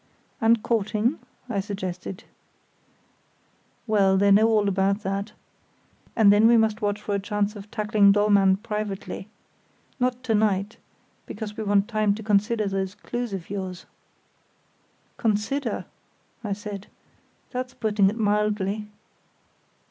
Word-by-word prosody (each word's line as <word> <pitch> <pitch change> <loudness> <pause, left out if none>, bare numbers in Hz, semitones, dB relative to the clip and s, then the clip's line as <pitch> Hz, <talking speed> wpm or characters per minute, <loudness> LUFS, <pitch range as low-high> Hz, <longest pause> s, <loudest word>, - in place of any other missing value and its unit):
"And 225 0 +4
courting?" 225 +4 0 0.3
I 220 -5 -1
suggested. 190 -2 -5 1.6
"Well, 195 -3 +3
they 200 +1 +4
know 215 +3 +6
all 215 -2 +2
about 195 +1 +1
that. 200 +2 -3 0.8
And 205 -3 +6
then 210 +2 +5
we 235 0 +6
must 220 0 +1
watch 205 0 0
for 210 - -4
a 200 - +1
chance 205 +1 -1
of 205 0 -10
tackling 210 -2 +3
Dollmann 200 -2 +4
privately. 210 -2 -4 0.7
Not 250 0 0
to 235 -3 0
night, 210 -1 +1 0.5
because 210 -1 -6
we 220 - -4
want 200 -1 +2
time 215 -3 +1
to 220 - -8
consider 210 +1 +1
those 195 0 -2
clues 240 +2 -4
of 190 -2 -6
yours." 185 -2 -5 1.3
"'Consider'?" 225 +6 -1 0.6
I 205 -2 -2
said: 205 -1 -7 0.6
"that's 255 0 -4
putting 210 -3 +2
it 215 - -5
mildly." 210 -1 0
210 Hz, 125 wpm, -25 LUFS, 200-220 Hz, 1.6 s, know